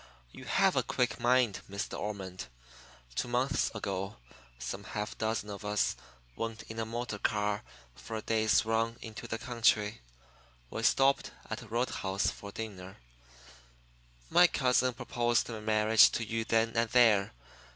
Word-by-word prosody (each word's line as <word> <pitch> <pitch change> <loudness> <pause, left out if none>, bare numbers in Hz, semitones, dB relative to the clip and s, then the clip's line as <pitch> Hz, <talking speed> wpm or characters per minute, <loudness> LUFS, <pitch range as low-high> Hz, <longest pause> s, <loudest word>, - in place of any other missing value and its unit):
You - - -11
have - - +3
a - - +4
quick 125 -1 -1
mind, 120 -3 +2
Miss 100 +1 -3
De - - -7
Ormond. 95 -3 -5 0.7
Two 60 - -2
months 125 +3 +1
ago 100 -1 -3 0.4
some - - -5
half 105 0 -4
dozen 110 -1 -2
of 100 0 -7
us 105 -1 +1 0.4
went 115 -1 -4
in 110 0 -8
a 110 - -2
motor 115 -2 -4
car 105 -1 0 0.3
for 110 - -8
a 110 - -3
day's 110 -1 +2
run 115 +1 0
into 110 -2 -8
the 115 - -3
country. 115 -3 +1 0.7
We 115 - -3
stopped 135 +4 +3 0.2
at - - -3
a - - -12
road 120 +3 -1
house 95 0 0
for 100 - -9
dinner. 100 -3 -7 1.3
My 180 - +6
cousin 125 -4 +2
proposed 120 -1 0
marriage 110 0 +5
to 115 - -1
you 115 0 -2
then 115 0 +2
and 115 0 +2
there. 110 - +4
110 Hz, 150 wpm, -31 LUFS, 105-120 Hz, 1.3 s, My